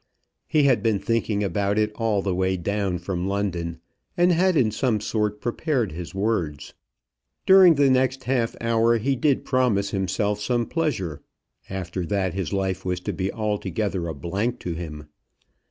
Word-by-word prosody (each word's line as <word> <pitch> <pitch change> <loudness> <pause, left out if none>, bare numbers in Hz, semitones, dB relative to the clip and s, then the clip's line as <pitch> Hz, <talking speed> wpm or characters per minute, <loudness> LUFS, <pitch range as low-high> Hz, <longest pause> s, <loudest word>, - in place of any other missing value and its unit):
He 150 - +3
had 130 -6 +4
been 110 -2 +2
thinking 110 -1 0
about 100 +2 0
it 105 0 +2
all 110 -3 0
the 95 - 0
way 95 +1 0
down 100 +1 -1
from 90 +1 -3
London, 90 -4 -2 0.4
and 175 +1 +4
had 180 0 +3
in 115 -6 +3
some 110 -1 0
sort 105 -1 -1
prepared 120 - -1
his 85 +4 -7
words. 90 -9 -2 0.7
During 190 -3 +8
the 140 -1 +4
next 130 0 +1
half 125 -3 0
hour 115 0 +2
he 135 +5 0
did 135 +2 +1
promise 115 -7 +1
himself 100 +2 -1
some 120 +2 0
pleasure, 115 - -2 0.5
after 95 -1 -4
that 95 -2 0
his 95 -3 -3
life 95 -1 -1
was 90 -1 -2
to - - -3
be 95 0 -2
altogether 100 -4 -2
a 80 - -4
blank 100 +8 -2
to 90 - -3
him. 75 -3 -7
105 Hz, 165 wpm, -24 LUFS, 95-120 Hz, 0.7 s, During